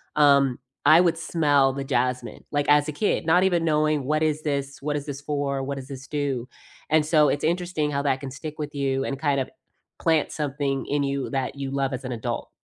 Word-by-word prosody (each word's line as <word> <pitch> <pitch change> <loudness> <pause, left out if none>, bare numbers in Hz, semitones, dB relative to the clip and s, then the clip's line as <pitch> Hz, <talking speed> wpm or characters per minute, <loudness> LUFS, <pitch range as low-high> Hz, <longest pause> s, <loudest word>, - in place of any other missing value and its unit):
um, 140 -4 +4 0.3
I 165 +3 +8
would 170 -2 +2
smell 145 -5 +2
the 140 - -4
jasmine, 125 -1 -2
like 145 -1 0
as 145 +1 +5
a - - -2
kid, 165 +3 0
not 180 +3 +4
even 175 -3 +2
knowing, 155 -2 +1
"What 155 +3 +1
is 155 0 0
this 140 -2 -3
what 145 +1 -2
is 145 - -3
this 140 -2 -5
for, 140 -1 -2
what 140 +1 -3
does 135 -1 -7
this 135 -1 -9
do," 140 -5 -2 0.4
and 155 0 +3
so, 150 -1 +4
it's 145 - -1
interesting 170 -2 0
how 140 0 0
that 135 -2 +1
can 135 -2 -6
stick 155 +3 -7
with 150 0 -4
you 135 -1 0
and, 135 -1 -3
kind 140 -2 +1
of, 130 - -4 0.5
plant 160 -2 +2
something 140 -2 -2
in 145 0 0
you 140 -1 -2
that 135 -1 -2
you 140 -1 -4
love 135 0 0
as 130 - -4
an 130 - -4
adult. 115 -3 -4
145 Hz, 225 wpm, -25 LUFS, 135-155 Hz, 0.5 s, I